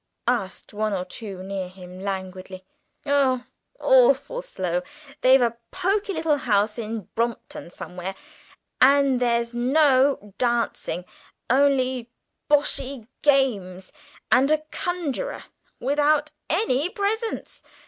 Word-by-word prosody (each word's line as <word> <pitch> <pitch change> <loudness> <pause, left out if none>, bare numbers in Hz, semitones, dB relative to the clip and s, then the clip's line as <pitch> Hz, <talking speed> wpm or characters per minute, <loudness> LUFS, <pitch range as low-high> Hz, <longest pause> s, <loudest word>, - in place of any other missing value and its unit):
asked 220 -7 -2
one 215 0 -1
or 180 -2 -2
two 190 -1 -8
near 190 -1 -4
him 180 0 -12
languidly. 190 -1 -6 0.4
"Oh, 270 -3 +2 0.4
awfully - - +4
slow! 180 - -2 0.4
They've 260 0 +6
a 235 -1 0
poky 395 +2 0
little 320 -3 +1
house 210 -3 +1
in 225 0 -4
Brompton 230 -6 -3
somewhere, 180 +2 -7 0.7
and 275 -1 +5
there 240 -1 +3
was 235 0 -3
no 260 -3 +3
dancing, 235 -7 -1 0.5
only 260 -3 +2 0.4
boshy 275 -4 +1 0.2
games 205 -11 +1 0.4
and 265 +3 +5
a 310 0 +2
conjurer, 355 - -3 0.4
without 295 +3 +2 0.2
any 325 - +1
presents. 445 +2 -3
255 Hz, 105 wpm, -24 LUFS, 200-290 Hz, 0.7 s, They've